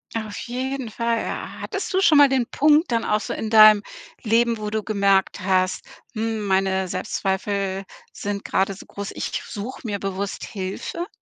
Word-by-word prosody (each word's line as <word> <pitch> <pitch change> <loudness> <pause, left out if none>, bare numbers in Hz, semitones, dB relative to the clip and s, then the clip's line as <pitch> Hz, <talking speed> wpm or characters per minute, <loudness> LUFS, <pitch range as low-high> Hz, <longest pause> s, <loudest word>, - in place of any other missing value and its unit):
Auf 220 -2 -4
jeden 260 0 -3
Fall, 230 +1 0
ja. - - -5
Hattest 395 -1 -4
du 375 - +3
schon 330 -5 +6
mal 285 - +8
den 260 -3 +1
Punkt 300 +3 +3
dann 230 -1 +1
auch 210 - +2
so - - -4
in 220 - -4
deinem 215 -2 +8 0.4
Leben, 230 +1 +2
wo 210 0 -4
du 215 -1 -2
gemerkt 200 -2 +2
hast: 185 -1 0 0.3
„Hm, 220 -2 -2
meine 190 -1 +1
Selbstzweifel 195 +1 -2 0.3
sind 200 0 -4
grade 195 +1 +1
so - - -12
groß, 200 0 -7
ich - - -4
suche 220 +5 -7
mir 200 -2 -2
bewusst 195 0 -4
Hilfe?“ 200 - -5
210 Hz, 170 wpm, -23 LUFS, 195-235 Hz, 0.4 s, mal